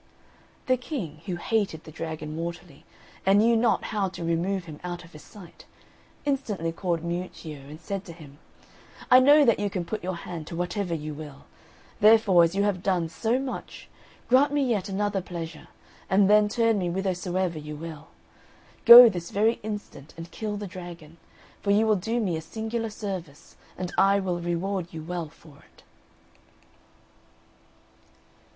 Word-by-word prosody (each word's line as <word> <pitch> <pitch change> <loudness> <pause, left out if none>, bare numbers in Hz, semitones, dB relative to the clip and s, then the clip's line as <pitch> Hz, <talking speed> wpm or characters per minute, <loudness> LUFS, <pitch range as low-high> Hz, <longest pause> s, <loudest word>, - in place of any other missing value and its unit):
The 255 -1 +2
King, 200 - -6
who 180 - -2
hated 190 -3 -1
the 155 - -11
dragon 155 -1 -6
mortally, 170 -2 -7 0.4
and 195 +1 +4
knew 230 +3 +4
not 225 -3 +2
how 200 -3 0
to 180 - -8
remove 170 +3 -1
him 155 -3 -10
out 175 0 -5
of 165 - -16
his 150 - -12
sight, 185 -5 -15 0.6
instantly 215 - -1
called 170 -1 -2
Miuccio, 170 -3 -5
and 155 +1 -10
said 195 +3 -5
to 170 - -9
him, 150 -3 -14 0.7
"I 255 - +9
know 290 +3 +6
that 230 -4 +3
you 205 0 -1
can 185 -3 -3
put 215 +2 -5
your 185 0 -3
hand 170 -2 -7
to - - -7
whatever 175 +1 -2
you 155 -1 -5
will; 150 -2 -10 0.5
therefore, 210 -5 +6
as 165 +2 +1
you 200 - +2
have 200 -3 0
done 180 -4 0
so 225 +8 0
much, 265 -1 -6 0.4
grant 265 +4 +4
me 290 -1 +1
yet 210 -5 -1
another 200 0 -1
pleasure, 165 -3 -7 0.4
and 195 +1 +4
then 210 0 +5
turn 230 -1 +2
me 180 - -1
whithersoever 180 -2 -2
you 150 0 -7
will. 160 -1 -9 0.8
Go 240 +1 +12
this 175 -5 -3
very 220 +3 +1
instant 205 -9 -7
and 165 0 -9
kill 210 +1 -4
the 205 - -5
dragon; 175 -4 -10 0.4
for 200 - -3
you 210 +2 +4
will 215 -1 +3
do 225 +5 -2
me 190 -7 -1
a 160 - -4
singular 225 +6 -4
service, 190 -8 -7 0.2
and 180 -1 -5
I 195 +1 +4
will 180 -3 -2
reward 175 +1 -3
you 160 - -6
well 170 -1 -4
for 155 -2 -18
it." - - -23
185 Hz, 170 wpm, -26 LUFS, 165-210 Hz, 0.8 s, Go